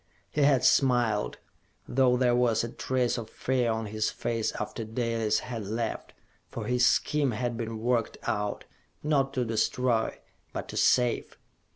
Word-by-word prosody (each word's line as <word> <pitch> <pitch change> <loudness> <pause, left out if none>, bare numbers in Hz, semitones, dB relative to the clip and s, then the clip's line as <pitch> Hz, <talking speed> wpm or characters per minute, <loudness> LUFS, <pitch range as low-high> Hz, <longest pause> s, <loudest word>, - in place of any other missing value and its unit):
He 150 - 0
had 140 -3 +4
smiled, 120 -7 +3 0.5
though 125 0 +3
there 125 -1 +3
was 120 -3 +2
a 115 - -3
trace 125 -2 0
of 110 -1 -7
fear 125 -3 0
on 110 0 -2
his 110 +1 -1
face 115 -2 -2
after 105 +2 -4
Dalis 115 -1 0
had 115 -5 -5
left, 115 +1 -3 0.3
for 110 - -6
his 125 +2 +1
scheme 150 -2 +2
had 120 +1 -2
been 115 -1 -4
worked 115 0 0
out 105 -1 -2 0.4
not 140 -3 +2
to 125 -2 +1
destroy, 115 +1 0 0.4
but - - -4
to - - -5
save! 125 -1 +2
120 Hz, 155 wpm, -28 LUFS, 110-125 Hz, 0.5 s, had